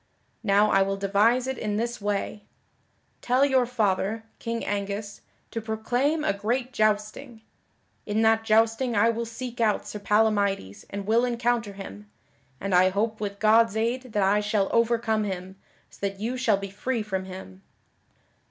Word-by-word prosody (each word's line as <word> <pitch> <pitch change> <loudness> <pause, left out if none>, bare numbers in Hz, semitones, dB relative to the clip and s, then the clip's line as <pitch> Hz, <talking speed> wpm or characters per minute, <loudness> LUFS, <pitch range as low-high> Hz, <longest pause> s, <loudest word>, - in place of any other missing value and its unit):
Now 210 0 +3
I 195 - +4
will 195 0 0
devise 205 +6 +2
it 265 -1 -3
in 210 -2 -2
this 235 +1 -2
way: 205 0 -2 0.8
tell 255 +3 +3
your 260 -3 +2
father, 220 -2 0 0.2
King 230 0 -3
Angus, 205 0 -4 0.3
to 225 - -3
proclaim 245 +8 0
a 250 - +1
great 240 +5 -2
jousting. 215 +2 -1 0.6
In 215 +2 +1
that 225 0 +4
jousting 225 +2 +2
I 225 +3 +4
will 230 0 -3
seek 240 +1 -6
out 215 -2 +1
Sir 210 - -6
Palamydes 200 - +1
and 200 0 -5
will 225 +3 +3
encounter 235 -3 0
him, 105 - -10 0.5
and 195 -1 -3
I 180 +1 +6
hope 215 +3 -1
with 200 -1 -3
God's 220 0 +4
aid 240 +3 -1
that 205 -2 +2
I 200 +2 +3
shall 205 -1 0
overcome 230 -2 +2
him, 190 -1 -5 0.4
so - - -18
that 195 -1 -3
you 230 +4 -2
shall 230 -5 +2
be 195 -1 -6
free 230 +3 -2
from 190 -3 -3
him." 185 - -10
215 Hz, 160 wpm, -26 LUFS, 200-235 Hz, 0.8 s, I